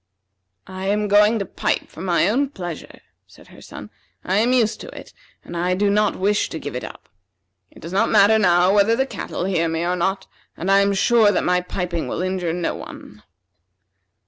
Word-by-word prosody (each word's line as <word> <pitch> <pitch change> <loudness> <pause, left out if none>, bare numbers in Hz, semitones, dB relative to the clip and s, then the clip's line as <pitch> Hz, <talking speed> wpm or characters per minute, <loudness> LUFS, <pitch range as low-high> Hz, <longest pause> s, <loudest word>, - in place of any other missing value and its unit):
"I 190 0 -6
am 210 +1 0
going 210 +2 +4
to 200 - -3
pipe - - -2
for 160 - -12
my 175 -2 +1
own 265 +6 +1
pleasure," 175 - -8 0.3
said - - -19
her - - -16
son. - - -11 0.3
"I 190 +2 0
am 230 +4 +2
used 235 -4 +1
to - - -9
it, - - -14 0.3
and 175 - -9
I 180 +2 0
do 200 +1 +1
not 210 0 +1
wish 205 +2 0
to - - -6
give - - -7
it - - -4
up. - - -10 0.6
It 305 - -18
does 170 - -8
not 225 +4 +2
matter 215 +1 +5
now 180 -1 +3
whether 210 +2 +3
the 265 +3 0
cattle 225 - -5
hear 180 -3 0
me 165 +1 -2
or 180 +1 0
not, 190 +2 -1 0.3
and 190 +3 -2
I 195 - +5
am 200 0 +2
sure 220 +1 +4
that 190 - 0
my 180 0 +1
piping 180 -2 -4
will - - -3
injure 185 -2 -2
no 175 0 -2
one." - - -11
195 Hz, 205 wpm, -21 LUFS, 180-210 Hz, 0.6 s, matter